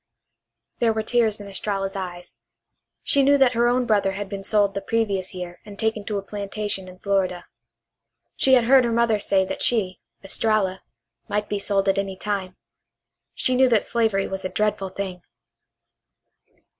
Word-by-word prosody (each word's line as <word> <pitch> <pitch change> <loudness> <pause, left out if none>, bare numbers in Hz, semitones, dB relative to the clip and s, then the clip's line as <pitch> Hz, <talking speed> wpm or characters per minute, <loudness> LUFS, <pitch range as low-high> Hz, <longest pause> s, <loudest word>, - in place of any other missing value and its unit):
There 230 -2 +3
were 220 0 -2
tears 225 -2 +1
in 205 - -9
Estralla's 195 0 -3
eyes. 180 -2 -6 0.7
She 280 - +4
knew 285 +1 +5
that 265 -2 +4
her 235 +1 +2
own 245 +1 +2
brother 205 -4 +2
had 200 0 -5
been 195 -1 -6
sold 205 -1 +2
the 200 - -3
previous 200 -5 -1
year 180 -1 -7
and 205 -1 -11
taken 220 -1 -1
to 210 -1 -2
a 200 - -4
plantation 200 -1 -4
in 185 0 -12
Florida. 185 -3 -1 0.9
She 265 -1 +4
had 245 - +4
heard 260 +2 +6
her 235 - 0
mother 230 -2 +2
say 195 -1 +2
that - - -5
she, 190 -6 +2 0.2
Estralla, 195 -1 0 0.5
might 210 0 -1
be 205 - -1
sold 195 -1 0
any 195 -1 0
time. 195 -2 -3 0.8
She 255 - +2
knew 260 0 +5
that 225 -3 +3
slavery 220 -4 0
was 190 0 -5
a 185 - -2
dreadful 210 -2 -1
thing. 185 -1 -5
205 Hz, 170 wpm, -23 LUFS, 195-225 Hz, 0.9 s, heard